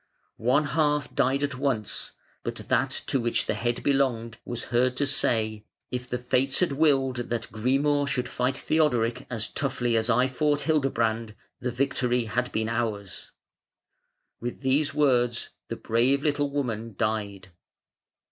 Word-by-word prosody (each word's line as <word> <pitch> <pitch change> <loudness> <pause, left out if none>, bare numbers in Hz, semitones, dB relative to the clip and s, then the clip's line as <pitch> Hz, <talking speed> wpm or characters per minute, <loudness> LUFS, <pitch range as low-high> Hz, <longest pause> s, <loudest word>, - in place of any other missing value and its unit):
One 130 +6 +3
half 150 0 +1
died 135 +3 +2
at 140 -3 -2
once, 115 -7 -1 0.3
but - - -4
that - - 0 0.2
to 135 - +1
which 120 -1 0
the - - 0
head 120 0 -2
belonged 120 -5 +1
was 120 -1 -4
heard 125 +1 +2
to 145 - +2
say: 110 -6 0 0.3
"If 125 0 -4
the 125 - -1
Fates 125 +2 +1
had 180 -4 +2
willed 135 -3 +2
that 120 -1 -3
Grimur 140 +5 +1
should 125 -3 -1
fight 125 +2 -1
Theodoric 125 -6 +1
as 115 -3 -1
toughly 120 -4 0
as 110 +1 +1
I 125 +2 +4
fought 145 +2 +1
Hildebrand, 115 -8 0 0.2
the 125 - -2
victory 125 -1 +1
had 125 +3 -1
been 110 0 -1
ours". 110 -4 -3 1.1
With 120 +2 -5
these 145 +3 +2
words 125 -5 +2 0.2
the - - -4
brave 125 +5 +1
little 145 -1 +1
woman 115 -6 -3
died. 100 -3 -2
125 Hz, 145 wpm, -27 LUFS, 115-140 Hz, 1.1 s, I